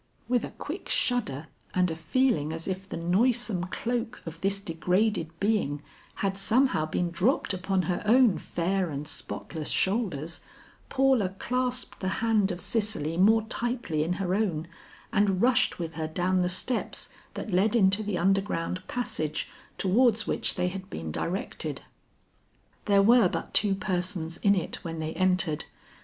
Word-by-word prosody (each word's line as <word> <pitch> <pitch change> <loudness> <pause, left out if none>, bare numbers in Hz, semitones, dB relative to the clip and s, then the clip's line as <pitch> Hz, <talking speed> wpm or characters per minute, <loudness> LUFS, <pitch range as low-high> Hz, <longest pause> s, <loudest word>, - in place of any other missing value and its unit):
'" - - -37
With 245 -1 +1
a - - -4
quick - - -7
shudder 165 - 0 0.3
and 180 -2 +2
a - - -3
feeling 165 - +1
as 165 +1 -5
if 190 +1 -4
the - - -4
noisome 200 +2 +2
cloak 235 +4 -3
of 165 0 -8
this 195 0 +1
degraded 180 +1 0
being 195 -9 0 0.4
had 195 0 -1
somehow 225 - +2
been 175 +2 -1
dropped 200 +5 +2
upon 185 0 0
her 180 -1 -1
own 230 -1 +5
fair 185 +1 -1
and 145 0 -5
spotless 155 0 -3
shoulders, 185 - 0 0.5
Paula 260 -8 +2
clasped 250 +1 -2
the 190 - -3
hand 220 -3 +2
of 175 0 -5
Cicely 205 -8 -1
more 215 +5 +5
tightly 230 -9 -2
in 170 +3 -1
her 185 -1 -2
own, 180 -6 0 0.5
and 200 -3 +2
rushed 245 +2 +3
with 165 -2 -4
her 160 0 -3
down 180 +3 +1
the 180 - +1
steps 210 +7 0 0.2
that 215 - -5
led 205 +5 +3
into 195 -1 +4
the 210 -3 -2
underground 190 -1 0
passage 155 -11 -2 0.3
towards 220 +3 +3
which - - 0
they 180 -1 0
had 190 +1 -7
been 80 -1 -5
directed. 180 - -3 1.0
There 200 -1 +4
were 230 -2 +6
but - - -4
two 200 -2 +4
persons 180 -4 -2
in 200 0 +3
it 180 - -2
when 165 -1 -5
they 160 0 -3
entered. 185 -4 +1
190 Hz, 155 wpm, -28 LUFS, 170-220 Hz, 1.0 s, were